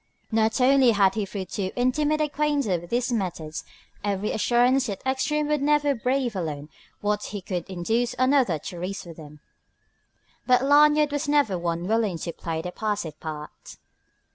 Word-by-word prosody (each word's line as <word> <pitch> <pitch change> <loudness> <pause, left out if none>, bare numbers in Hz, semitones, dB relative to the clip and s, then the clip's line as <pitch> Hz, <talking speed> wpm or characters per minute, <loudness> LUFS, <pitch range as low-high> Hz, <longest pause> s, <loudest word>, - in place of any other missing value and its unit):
Not 220 +2 +2
only 260 -1 +5
had 195 -2 +4
he 210 -1 -2
through 195 -1 -5
too 190 +1 -3
intimate 295 +5 +1
acquaintance 290 - 0
with 175 - -12
his 245 +1 0
methods 170 -7 -3 0.4
every 205 0 -1
assurance 250 +4 +2
that 200 -3 -5
Ekstrom 295 +3 0
would 300 -2 +1
never 295 0 +3
brave 250 -1 -1
alone 150 -5 -4 0.3
what 210 0 -1
he 205 - -5
could 180 -1 -5
induce 225 +7 -1
another 255 - +3
to 175 +4 -8
risk 185 +2 -5
with 170 -2 -11
him, 150 -2 -12 1.1
but 250 0 +4
Lanyard 295 +1 +5
was 290 +1 -2
never 285 -10 +3
one 170 0 -2
willing 215 -4 +1
to 170 +1 -5
play 165 -1 -4
the 180 - -4
passive 205 -7 -3
part. 150 -1 -8
220 Hz, 165 wpm, -25 LUFS, 180-270 Hz, 1.1 s, only